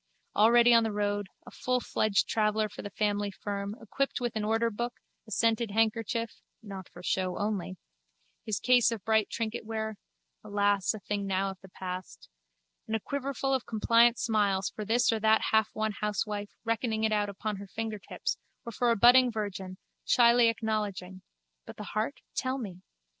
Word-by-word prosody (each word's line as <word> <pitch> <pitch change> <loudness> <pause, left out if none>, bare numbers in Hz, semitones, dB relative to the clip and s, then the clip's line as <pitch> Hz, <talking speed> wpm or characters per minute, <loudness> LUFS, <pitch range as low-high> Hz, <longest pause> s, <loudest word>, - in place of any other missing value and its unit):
already 235 +3 +6
on 230 - +7
the 220 - -1
road, 205 -1 -1 0.2
a - - -11
fullfledged 240 -4 +1
traveller 215 0 +1
for 205 - -9
the 205 - -6
family 205 0 0
firm, 200 +1 -4
equipped 275 +5 -2
with 240 -2 -2
an 215 - -1
orderbook, 230 +2 0 0.3
a - - -13
scented 230 +1 +1
handkerchief 225 +1 0 0.2
(not 195 -3 -8
for 175 - -13
show 185 0 -1
only), 200 -3 -2 0.7
his 215 -2 -2
case 250 -2 +4
of 220 -5 -5
bright 220 -1 +2
trinketware 220 -1 -3 0.5
(alas! 205 -1 +1
a - - -7
thing 200 0 -3
now 195 0 0
of 190 - -12
the 190 - -13
past!) 185 0 -7 0.6
and 220 - -1
a - - 0
quiverful 275 +2 -2
of 260 -2 -1
compliant 230 +2 +4
smiles 205 -4 +1
for 215 - -6
this 230 +3 +3
or 225 - 0
that 220 0 +3
halfwon 220 0 +1
housewife 210 0 -2
reckoning 225 -1 -1
it 220 - +2
out 205 -1 +1
upon 200 +1 -4
her 200 +1 -9
fingertips 220 0 -4 0.3
or 235 - -5
for 240 +2 +1
a 230 - +4
budding 245 +3 +6
virgin, 195 -4 -5 0.3
shyly 235 -1 +5
acknowledging 210 -4 -3 0.4
(but - - -11
the 210 - -6
heart? 215 +6 -3
tell 260 0 -1
me!) 190 -8 -7
215 Hz, 165 wpm, -29 LUFS, 205-230 Hz, 0.7 s, on